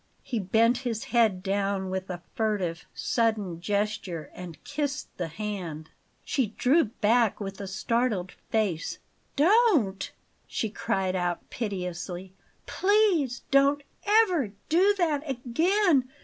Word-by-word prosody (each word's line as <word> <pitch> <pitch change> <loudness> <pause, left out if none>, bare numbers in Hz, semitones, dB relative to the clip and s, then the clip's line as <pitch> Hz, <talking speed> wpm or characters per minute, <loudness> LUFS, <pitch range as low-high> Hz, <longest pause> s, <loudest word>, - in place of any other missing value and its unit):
He 235 - -2
bent 225 +5 +3
his 235 -4 -3
head 220 -6 +2
down 195 -1 -1
with 190 0 -3
a 175 -1 -5
furtive, 200 -7 -1
sudden 215 -7 0
gesture 200 -5 -2
and 170 -4 -9
kissed 285 -2 -3
the 175 - -2
hand. 170 -4 -5 0.3
She 235 -7 -1
drew 290 +6 +4
back 225 +1 +2
with 195 -1 -5
a 200 - -5
startled 215 -1 0 0.2
face. 200 -7 0 0.4
"Don't!" 310 - +3 0.4
she 220 - -2
cried 195 -5 -1
out 175 -1 -2
piteously. 185 -3 -4 0.3
"Please 375 - +2
don't 280 +1 +4 0.4
ever 320 - -1 0.2
do 380 +6 +4
that 315 -6 +1
again! 275 - +2
215 Hz, 120 wpm, -27 LUFS, 190-270 Hz, 0.4 s, drew